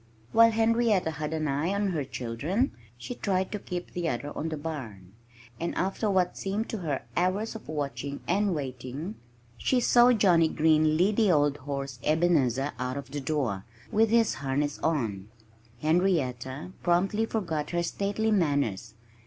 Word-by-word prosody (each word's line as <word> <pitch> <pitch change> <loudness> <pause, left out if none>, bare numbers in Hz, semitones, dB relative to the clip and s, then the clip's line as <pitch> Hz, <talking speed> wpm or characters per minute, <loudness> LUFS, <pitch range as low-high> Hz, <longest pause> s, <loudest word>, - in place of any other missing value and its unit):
While 230 0 +7
Henrietta 225 -5 +2
had 150 0 -4
an 155 -1 -1
eye 145 +6 0
on 200 0 +1
her 160 -6 -1
children, 135 - -2 0.3
she 185 - -6
tried 190 -5 -1
to 210 - -3
keep 180 -2 -6
the 175 -2 -2
other 145 +3 -4
on 160 - -2
the 155 - -4
barn. 115 - -7 0.5
And 170 - -2
after 195 +3 0
what 185 -2 +2
seemed 200 +3 -3
to 220 - -3
her 150 -6 -2
hours 185 +5 0
of 225 - -10
watching 140 -2 -3
and 195 0 +2
waiting, 135 - -5 0.5
she 255 - +2
saw 240 0 +6
Johnnie 180 -8 +4
Green 155 0 +3
lead 200 +5 +2
the 220 -3 +4
old 145 -2 +3
horse 140 -3 -4
Ebenezer 150 -5 +2
out 125 +1 -2
of 140 -1 -7
the 145 0 -3
door, 130 -10 -1 0.3
with 220 +1 +3
his 230 -1 +3
harness 145 +2 -1
on. 110 -12 -1 0.6
Henrietta 155 -5 0
promptly 195 +6 +2
forgot 160 -10 -2
her 170 0 0
stately 205 +5 -1
manners. 140 - 0
160 Hz, 160 wpm, -28 LUFS, 140-200 Hz, 0.6 s, While